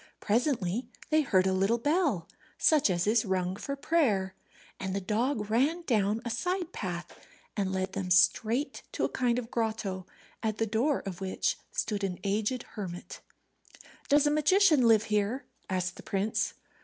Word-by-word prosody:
Presently 230 - 0 0.2
they 310 0 +5
heard 190 -10 +3
a 190 - +2
little 195 +5 +2
bell, 290 - +1 0.3
such 300 -7 +4
as 175 -1 +1
is 220 +2 +3
rung 185 -2 -1
for 275 +7 -4
prayer, 255 - +1 0.5
and 190 0 -3
the - - 0
dog 215 +2 -1
ran 295 +10 +2
down 220 -4 +1
a - - -2
side 355 +7 -2
path 175 -3 -6 0.3
and 195 -3 -1
led 190 0 -2
them 195 -2 -3
straight 220 - +3
to - - -2
a - - -1
kind 245 -2 +1
of 245 -1 -4
grotto, 215 -5 -2 0.3
at 220 -2 -1
the 225 - +1
door 230 +7 +1
of 195 -2 -7
which 190 -1 0 0.2
stood 210 -2 -2
an 185 -2 -2
aged 210 +5 0
hermit. 180 -5 -7 0.9
"Does 290 +1 +5
a 295 - +3
magician 305 - +4
live 220 -2 +5
here?" 210 +5 -1 0.2
asked 185 -1 -2
the - - -9
prince. 210 +2 -1
215 Hz, 165 wpm, -29 LUFS, 190-265 Hz, 0.9 s, they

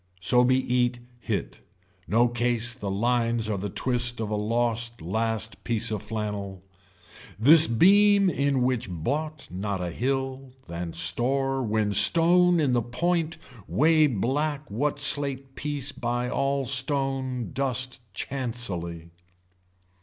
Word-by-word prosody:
So 125 +7 +3
be 130 +1 +3
eat 125 -1 0 0.2
hit. - - -4 0.5
No 115 +8 +3
case 120 0 -1
the 110 -5 -6
lines 115 +2 0
are 105 -3 -2
the 100 +2 -4
twist 120 +2 -1
of 110 -2 -4
a - - 0
lost 115 +2 -1
last 110 +3 -3
piece 115 -1 -2
of 105 -3 -3
flannel. 105 -3 -5 0.7
This 155 +9 +7
beam 200 - +4
in 140 -5 0
which 125 -4 -1
bought 145 - -4
not 100 +1 -4
a 90 -1 -4
hill 135 +3 -3
than 85 0 -6
store 130 +10 0
when 110 -3 -1
stone 170 - +5
in 140 -5 +1
the 120 - +2
point 165 +7 -2 0.3
way 155 +1 +3
black 140 +4 -2
what 145 +8 -1
slate 140 -2 +2
piece 145 -1 -5
by 120 -1 -3
all 135 +1 -1
stone 130 -1 -1
dust 130 -1 -1 0.2
chancely. 90 -12 -4
125 Hz, 130 wpm, -25 LUFS, 110-140 Hz, 0.7 s, This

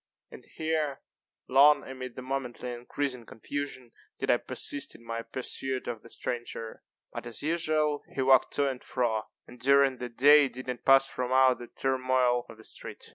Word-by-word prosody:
And - - -12
here, 155 -3 -2 0.5
long, 140 +2 +5
amid 130 -2 -7
the 130 - -7
momently 125 -2 -4
increasing 125 +1 -4
confusion, 130 +1 -6 0.3
did - - +1
I - - +4
persist 145 -1 -3
in 115 - -16
my 115 0 -3
pursuit 130 +2 -4
of 115 -3 -4
the 115 - -15
stranger. 120 -2 -5 0.3
But, - - -6
as 120 - -5
usual, 155 -2 +1
he 135 - 0
walked 130 -1 +5
to 145 -1 +3
and 130 -2 -4
fro, 115 -4 -1 0.2
and 125 - -14
during 140 +1 +4
the 125 - -4
day 140 +4 +6
did 130 0 -9
not 125 -2 -5
pass 135 0 +7
from 125 -2 -4
out 130 -1 +5
the 120 - -8
turmoil 130 -2 +1
of 115 - -11
that 110 - -15
street. - - -8
130 Hz, 180 wpm, -29 LUFS, 120-140 Hz, 0.5 s, pass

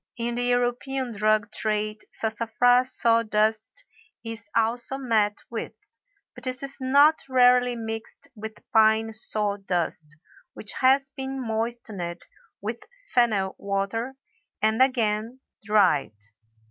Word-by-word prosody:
In 235 0 -2
the 240 - -2
European 245 +1 0
drug 215 -1 +1
trade 215 0 -2
Sassafras 235 +3 +2
saw 230 0 +4
dust 215 - -1 0.4
is 225 -3 -7
also 235 +3 0
met 220 -6 +1
with, 230 - -4 0.6
but - - -13
this 255 +1 -4
is 275 0 -5
not 285 +4 +5
rarely 250 -1 +5
mixed 225 -1 -7
with 220 -1 -9
pine 220 0 +4
saw 210 -2 -2
dust 170 -5 -3 0.4
which 210 - -7
has 270 +1 +4
been 270 0 -5
moistened 220 -7 -4 0.4
with 220 +3 -4 0.3
fennel 215 -6 +2
water 200 +6 -2 0.4
and 220 +3 +2
again 230 -2 +1 0.2
dried. 190 - +3
225 Hz, 115 wpm, -25 LUFS, 210-245 Hz, 0.6 s, not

